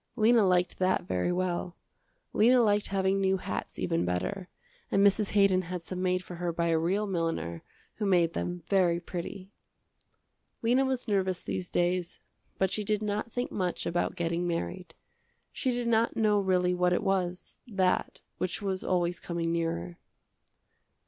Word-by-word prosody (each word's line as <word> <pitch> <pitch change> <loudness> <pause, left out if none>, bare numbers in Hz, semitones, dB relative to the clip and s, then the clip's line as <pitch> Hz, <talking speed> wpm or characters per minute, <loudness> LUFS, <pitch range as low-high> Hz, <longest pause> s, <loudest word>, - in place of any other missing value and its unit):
Lena 225 +1 +5
liked 180 -1 +1
that 185 0 +2
very 90 - -1
well. 180 0 -2 0.6
Lena 245 +4 +5
liked 205 -1 +2
having 195 0 +1
new 190 0 +2
hats 100 - -5
even 85 - 0
better, 90 - -2 0.4
and 195 +1 +3
Mrs. 200 +1 +3
Haydon 200 -2 +4
had 180 -1 -6
some 180 +1 -5
made 185 0 +1
for 180 - -9
her 175 0 -1
by 170 0 0
a 165 -1 +3
real 190 +6 +1
milliner 165 - -2 0.4
who 210 - -1
made 175 -3 +3
them 175 -1 -3
very 180 -4 +3
pretty. 185 +2 -7 1.1
Lena 250 +4 +3
was 260 -2 -2
nervous 190 -3 +1
these 180 -1 -4
days, 175 0 0 0.4
but 190 -1 +1
she 210 - -1
did 210 +1 0
not 210 +2 -2
think 245 +2 -3
much 180 -3 -2
about 175 +2 -1
getting 170 0 -1
married. 170 0 -4 0.6
She 260 - -2
did 245 -1 -1
not 230 0 +2
know 210 -2 +3
really 180 -2 +2
what 180 0 +2
it - - 0
was, 180 -2 -2
that, 190 -5 0 0.2
which 185 - -2
was 190 -2 -2
always 175 -1 0
coming 170 -1 -2
nearer. 170 +1 -2
185 Hz, 160 wpm, -29 LUFS, 175-200 Hz, 1.1 s, Lena